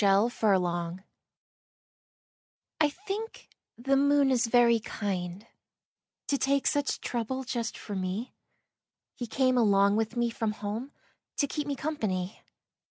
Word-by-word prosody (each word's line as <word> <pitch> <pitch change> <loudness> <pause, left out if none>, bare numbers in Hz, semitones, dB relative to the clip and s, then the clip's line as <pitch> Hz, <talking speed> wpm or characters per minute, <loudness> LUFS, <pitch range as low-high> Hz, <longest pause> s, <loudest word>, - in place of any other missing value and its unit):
II - - +5
The 200 +5 +3
Kind 195 -4 +4
Moon 175 +1 -3 1.8
I 305 -1 +4
think 405 +7 -6 0.3
the 270 +4 +1
moon 280 0 +4
is 245 -2 +2
very 235 -1 +5
kind 195 -2 -4 0.8
To 280 - +1
take 275 0 +2
such 285 -1 +1
trouble 250 +2 -2
just 240 -2 -3
for 205 - -6
me. 190 +5 -3 0.8
He 240 - -5
came 255 +1 +2
along 200 -2 +4
with 225 +2 -1
me 240 -1 +1
from 225 -2 -1
home 215 +6 -5 0.5
To 285 - +3
keep 290 +1 -3
me 285 - -1
company. 215 -10 -2
235 Hz, 135 wpm, -29 LUFS, 200-275 Hz, 1.8 s, II